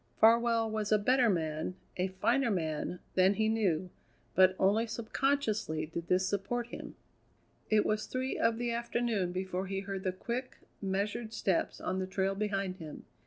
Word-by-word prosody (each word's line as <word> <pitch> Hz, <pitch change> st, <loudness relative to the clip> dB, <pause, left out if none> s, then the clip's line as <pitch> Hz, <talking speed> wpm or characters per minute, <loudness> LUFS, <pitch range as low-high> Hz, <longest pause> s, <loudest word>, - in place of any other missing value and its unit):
Farwell 230 Hz, 0 st, +5 dB
was 215 Hz, -1 st, -2 dB
a 215 Hz, -, +6 dB
better 250 Hz, +3 st, +3 dB
man, 160 Hz, -1 st, -1 dB, 0.2 s
a 185 Hz, +1 st, 0 dB
finer 235 Hz, +8 st, +1 dB
man, 165 Hz, -2 st, -1 dB, 0.2 s
than 190 Hz, +2 st, +4 dB
he 220 Hz, +1 st, +2 dB
knew, 190 Hz, -6 st, +1 dB, 0.4 s
but 185 Hz, 0 st, +5 dB
only 215 Hz, +4 st, +3 dB
subconsciously 220 Hz, -, 0 dB
did 170 Hz, +2 st, -6 dB
this 185 Hz, +1 st, +2 dB
support 205 Hz, +5 st, -1 dB
him. -, -, -8 dB, 0.7 s
It 215 Hz, -1 st, +4 dB
was 215 Hz, 0 st, 0 dB
three 260 Hz, +1 st, -2 dB
of 230 Hz, 0 st, +2 dB
the 240 Hz, 0 st, -1 dB
afternoon 235 Hz, -5 st, 0 dB
before 185 Hz, +1 st, -3 dB
he 195 Hz, 0 st, -2 dB
heard 195 Hz, -1 st, -4 dB
the 185 Hz, -, +1 dB
quick, 235 Hz, +7 st, -4 dB, 0.2 s
measured 205 Hz, +3 st, -2 dB
steps 190 Hz, -4 st, 0 dB
on 185 Hz, +1 st, -2 dB
the 185 Hz, -, -2 dB
trail 190 Hz, +1 st, 0 dB
behind 195 Hz, -2 st, -2 dB
him. 155 Hz, -4 st, -9 dB
200 Hz, 165 wpm, -32 LUFS, 185-230 Hz, 0.7 s, a